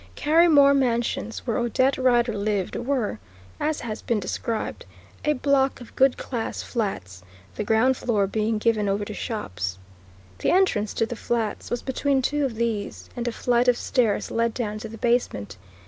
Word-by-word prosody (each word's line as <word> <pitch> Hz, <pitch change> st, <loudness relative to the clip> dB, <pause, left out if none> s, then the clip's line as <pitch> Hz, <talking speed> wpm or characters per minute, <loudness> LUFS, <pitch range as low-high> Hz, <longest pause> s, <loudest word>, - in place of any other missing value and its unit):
Carrymore 300 Hz, -, +5 dB
Mansions, 235 Hz, -3 st, -1 dB
where 230 Hz, -3 st, 0 dB
Odette 255 Hz, +3 st, +2 dB
Rider 240 Hz, -3 st, +3 dB
lived, 200 Hz, -2 st, -1 dB
were, 240 Hz, -, -1 dB, 0.4 s
as 305 Hz, 0 st, -1 dB
has 220 Hz, -2 st, -5 dB
been 230 Hz, -3 st, 0 dB
described, 220 Hz, +3 st, -3 dB, 0.4 s
a 300 Hz, -, +3 dB
block 275 Hz, -1 st, +1 dB
of 240 Hz, -, -13 dB
good 265 Hz, -1 st, +4 dB
class 235 Hz, -4 st, -4 dB
flats, 145 Hz, -, -3 dB, 0.3 s
the -, -, -3 dB
ground 225 Hz, +5 st, +3 dB
floor 215 Hz, -5 st, +1 dB
being 215 Hz, +2 st, 0 dB
given 215 Hz, -2 st, +1 dB
over 200 Hz, +1 st, 0 dB
to 210 Hz, -, -6 dB
shops. 95 Hz, -, -4 dB, 0.6 s
The -, -, +1 dB
entrance 340 Hz, -, +2 dB
to 225 Hz, -, +2 dB
the 240 Hz, -, -5 dB
flats 230 Hz, -2 st, -2 dB
was 240 Hz, -, -2 dB
between 270 Hz, 0 st, 0 dB
two 295 Hz, +2 st, +1 dB
of 250 Hz, -4 st, -3 dB
these, 220 Hz, -3 st, -3 dB
and 240 Hz, -1 st, -3 dB
a -, -, +1 dB
flight 245 Hz, +1 st, +1 dB
of 245 Hz, -1 st, +4 dB
stairs 230 Hz, -6 st, 0 dB
led 230 Hz, 0 st, 0 dB
down 215 Hz, -3 st, -3 dB
to 220 Hz, -, -7 dB
the 225 Hz, -, -9 dB
basement. 225 Hz, -, 0 dB
235 Hz, 170 wpm, -25 LUFS, 210-255 Hz, 0.6 s, Carrymore